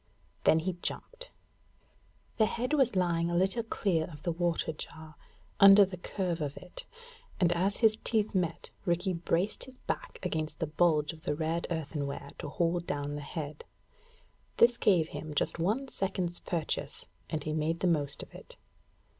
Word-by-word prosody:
Then 160 - +6
he 180 +3 0
jumped. - - -4 1.1
The 220 - +5
head 245 +5 -2
was 270 -8 +3
lying 170 -2 +2
a 175 - -1
little 190 +6 +2
clear 195 -7 0
of 150 -3 -11
the 175 - 0
water 170 -1 0
jar, 155 +1 -8 0.5
under 200 0 +10
the 190 -1 -7
curve 180 -1 -3
of 145 -1 -3
it; - - -7 0.5
and, 175 -2 +4
as 185 +4 +1
his 215 0 +4
teeth 215 -2 +1
met, 175 -4 -1
Rikki 175 +2 +1
braced 175 +3 0
his 260 -1 -14
back - - -3
against 155 -1 -2
the 165 - -1
bulge 155 -1 +2
of 160 - -14
the - - 0
red 165 +2 -1
earthen 155 -3 -2
rare 140 - -6
to - - -5
hold 170 +3 0
down 145 0 -2
the 145 - -4
head. 150 0 -6 0.9
This 240 +1 +6
gave 175 -8 +3
him 150 +1 -6
just 165 - 0
one 215 +11 +1
second's 185 -6 -2
purchase, 155 -3 -2 0.2
and 155 -3 -2
he 155 - -2
made 160 +2 0
the - - +1
most 145 -5 +1
of - - -14
it. - - -11
170 Hz, 170 wpm, -31 LUFS, 155-195 Hz, 1.1 s, under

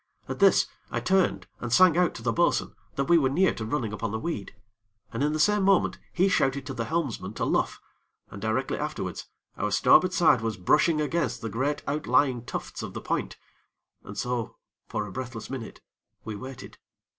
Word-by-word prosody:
At - - -5
this, - - +5 0.2
I - - -2
turned 190 0 +1
and 125 - -5
sang 180 +4 +6
out 175 -1 +2
to - - -8
the - - +1
bo'sun - - +1 0.2
that 140 - +1
we 170 +4 +5
were 135 -3 +2
near 175 +6 +3
to 110 - -6
running 115 -2 -2
upon 105 +1 -3
the 110 - -2
weed, 110 - -4 0.6
and, 115 - -3
in 150 - +2
the 155 - -2
same 210 +5 +4
moment, 195 -1 +3
he 185 +2 +3
shouted 135 -7 +1
to 140 - -5
the 115 -3 -3
helmsman 160 -6 -2
to - - -1
luff, - - 0 0.5
and 100 -1 -9
directly 110 +1 -1
afterwards - - -4 0.3
our 105 - -1
starboard 180 - +5
side 170 -9 +4
was 110 -1 -2
brushing 155 - +3
against 150 -6 -1
the 115 - -2
great 135 +7 -1
outlying 130 -3 +1
tufts - - -6
of - - -7
the - - -4
point, - - -2 0.7
and 100 - -9
so, 125 -1 -2 0.3
for 105 - -2
a 100 - -8
breathless 125 -1 -6
minute, 125 -5 -7 0.4
we 110 -1 -4
waited. 130 +4 -9
130 Hz, 190 wpm, -27 LUFS, 115-160 Hz, 0.7 s, sang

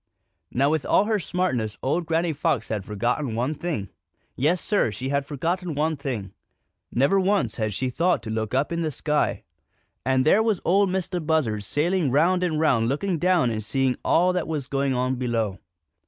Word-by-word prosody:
Now 140 +4 +2
with 155 -2 0
all - - +3
her 215 -1 +1
smartness 145 - -1
old 165 +5 0
Granny 165 0 +1
Fox 155 +2 -1
had 105 -3 -2
forgotten 120 +5 -2
one 125 +6 0
thing. 150 - -4 0.5
Yes, 160 +7 +2
Sir, 205 - +1
she 125 +5 -5
had 140 0 0
forgotten 170 +3 -2
one 155 +2 +1
thing. 120 -9 -5 0.6
Never 140 +11 +3
once 190 - +1
had 110 -1 -1
she 130 +3 -1
thought 175 +6 +1
to 110 - -5
look 110 -1 -2
up 140 +4 +1
in 170 0 -1
the 160 - 0
sky. 150 -6 -1 0.6
And 130 0 +2
there 195 +7 +5
was 220 -5 +1
Ol' 195 +3 +4
Mistah 185 -1 -2
Buzzard 150 -10 0
sailing 165 - +1
round 170 +7 +3
and 160 -4 0
round 135 -8 +3
and - - 0
looking 165 +5 -1
down 175 -8 +3
and 110 -1 -3
seeing 130 +3 +1
all 180 +2 +3
that 180 -2 -1
was 150 -4 -3
going 135 0 0
on 130 +1 0
below. 115 -6 -1
145 Hz, 190 wpm, -24 LUFS, 125-175 Hz, 0.6 s, there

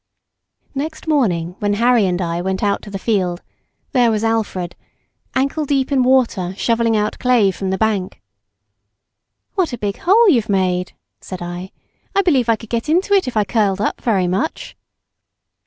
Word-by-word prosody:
Next 310 +3 -5
morning 180 - +1
when 205 0 0
Harry 235 -2 +3
and 180 0 -1
I 170 -1 -2
went 190 +2 -2
out 200 -1 +1
into - - -11
the 200 - -4
field, 185 -4 -1 0.5
there 245 -3 +3
was 220 -1 0
Alfred, 210 -6 -1 0.6
ankle 275 +4 0
deep 275 -1 0
in 270 -2 +3
water 235 -8 +2
shovelling 230 -1 +1
out 210 0 -1
clay 240 -6 +3
from 190 +1 -4
the 190 - 0
bank. 205 -4 -1 1.3
"What 365 -9 0
a - - -3
big 205 -2 -3
hole 435 +6 +4
you've 235 - +3
made," 185 -2 0 0.3
said 185 -2 -7
I. 175 +2 -6 0.5
"I 395 - +4
believe 265 -10 +2
I 230 - +5
could 220 0 -13
get 235 +5 -2
into 370 +5 +2
it 385 -8 +3
if 245 - -3
I 210 - +4
curled 200 -2 0
up 210 - -2
very 200 -6 +1
much." 190 - -3
220 Hz, 170 wpm, -19 LUFS, 190-260 Hz, 1.3 s, I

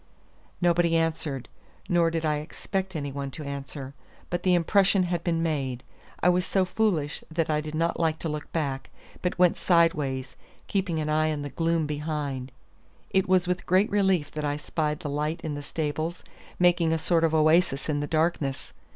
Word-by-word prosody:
Nobody 170 -1 +3
answered, 160 -5 -1 0.4
nor 170 -2 +3
did 165 -1 -2
I 150 -1 +2
expect 190 +5 -4
any 145 -2 -3
one 140 0 -4
to 150 +3 -8
answer, 140 -1 -6 0.4
but 175 0 -1
the 180 -1 +3
impression 195 +2 +3
had 175 -1 -1
been 165 -2 0
made. 135 -6 -2 0.4
I - - +5
was 180 0 +3
so 190 +2 +1
foolish 180 -7 0
that 160 -1 0
I 150 0 +1
did 155 0 -6
not 165 +2 0
like 160 -1 +1
to - - -2
look 150 -1 -5
back, 140 -5 -2 0.3
but 180 - -1
went 180 -1 +4
sideways, 150 -7 +2 0.3
keeping 190 -4 -1
an 155 - -2
eye 155 +1 +2
on 145 -2 -3
the 145 - -4
gloom 165 -1 +1
behind. 145 -3 -3 0.6
It 190 -1 +2
was 185 -1 +4
with 180 0 -2
great 190 +4 +3
relief 190 -7 +2
that 150 - -4
I 145 0 0
spied 150 0 -2
the - - -4
light 150 +3 -1
in 155 - -3
the 145 - -4
stables, 155 +3 -3 0.3
making 175 -2 +3
a 165 - +2
sort 165 +1 +1
of 160 -1 +3
oasis 155 -2 +3
in 150 -2 0
the 145 - -2
darkness. 155 -3 -1
160 Hz, 185 wpm, -27 LUFS, 150-175 Hz, 0.6 s, I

